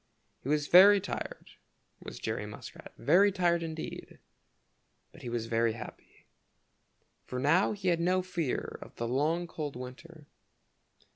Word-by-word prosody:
He 135 - -6
was 150 0 +1
very 200 +3 +8
tired, 190 - -6 0.5
was - - -8
Jerry - - -3
Muskrat, - - -10
very 190 +7 +4
tired 175 -3 +1
indeed, 160 -1 -6 0.9
but - - -15
he 120 - -6
was 120 -1 -2
very 115 0 +1
happy, 115 - -11 1.0
for 125 - -5
now 145 +11 +3
he 195 -3 -1
had 170 -1 +2
no 180 +2 +1
fear 170 -7 -3
of - - -12
the 115 - -3
long 155 +8 0
cold 155 -4 -6
winter. 140 +6 -10
165 Hz, 140 wpm, -30 LUFS, 130-180 Hz, 1.0 s, very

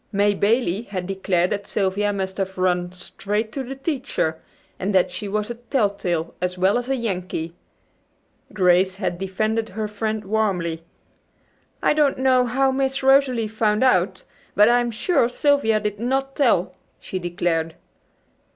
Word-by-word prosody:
May 205 0 +2
Bailey 210 -1 +1
had 185 -3 -4
declared 185 -2 0
that 200 -1 -3
Sylvia 205 +1 0
must 190 -1 -3
have 190 -1 -3
"run 180 -1 0
straight 205 +4 -4
to 275 - -4
the 265 +2 -6
teacher," 270 - -2 0.4
and 195 +2 -1
that 180 -1 +3
she 205 +3 -5
was 210 +3 -2
a - - -2
telltale 200 - -1
as 180 0 -2
well 190 +6 +3
as 245 +1 -6
a 270 - +2
"Yankee." 185 -8 -3 1.0
Grace 185 -1 +3
had 185 -3 -3
defended 215 +4 -1
her 215 +2 -3
friend 215 0 -3
warmly. 190 -6 -1 1.0
"I - - +4
don't 295 -2 +2
know 255 -1 +3
how 265 +3 +2
Miss 270 0 -1
Rosalie 265 -4 +4
found 215 +1 +1
out, 185 -6 +2 0.3
but 210 +1 +6
I'm 240 0 +3
sure 235 - +1
Sylvia 250 -5 +2
did 210 -1 -3
not 270 +3 -1
tell," 230 -10 +2 0.3
she 185 - -5
declared. 170 -2 -1
210 Hz, 150 wpm, -22 LUFS, 185-240 Hz, 1.0 s, but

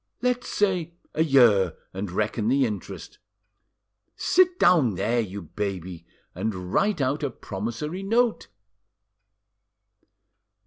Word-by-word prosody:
"Let's 250 0 0
say 180 -5 0 0.2
a 160 - +2
year, 115 - +4 0.2
and 95 +1 -4
reckon 105 +3 -1
the 135 +2 +3
interest. 105 -4 -7 1.0
Sit 365 -1 +3
down 145 - +4
there, 120 +7 0
you 100 -3 -4
baby, 90 -1 -5 0.3
and 95 -1 -4
write 200 -6 +2
out 135 +3 0
a 145 - -1
promissory 120 - -5
note." 225 +3 +1
120 Hz, 105 wpm, -25 LUFS, -, 1.0 s, year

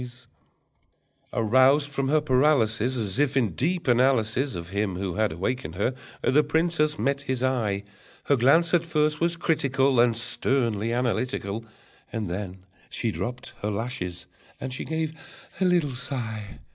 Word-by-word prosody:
Aroused 130 +6 +3
from 135 -1 -1
her 155 +2 +4
paralysis, 130 -4 +2
As 110 0 -3
if 145 -1 +2
in 115 -7 +2
deep 170 - -1
analysis 125 0 +2
Of 85 0 -6
him 100 -1 -1
who 95 -1 -3
had 110 +2 +1
awakened 85 0 -3
her, 105 +7 0 0.3
the 145 +4 +4
princess 155 0 +1
met 140 0 0
his 130 -3 -2
eye: 110 -7 0 0.4
Her 140 - +3
glance 145 +8 +4
at 175 -1 +4
first 150 -2 0
was 170 0 +1
critical, 135 -5 +2
And 120 -1 +4
sternly 115 -2 +1
analytical. 115 -3 -1 0.5
And 105 -6 -3
then 95 0 -6 0.2
she 115 - -2
dropped 125 +3 -5
her 105 - -1
lashes 100 -5 -4 0.3
and 130 0 -5
she - - -5
gave 160 +1 -2 0.5
a - - +4
little 175 -6 +2
sigh. 120 -5 -4
125 Hz, 145 wpm, -26 LUFS, 110-145 Hz, 0.5 s, her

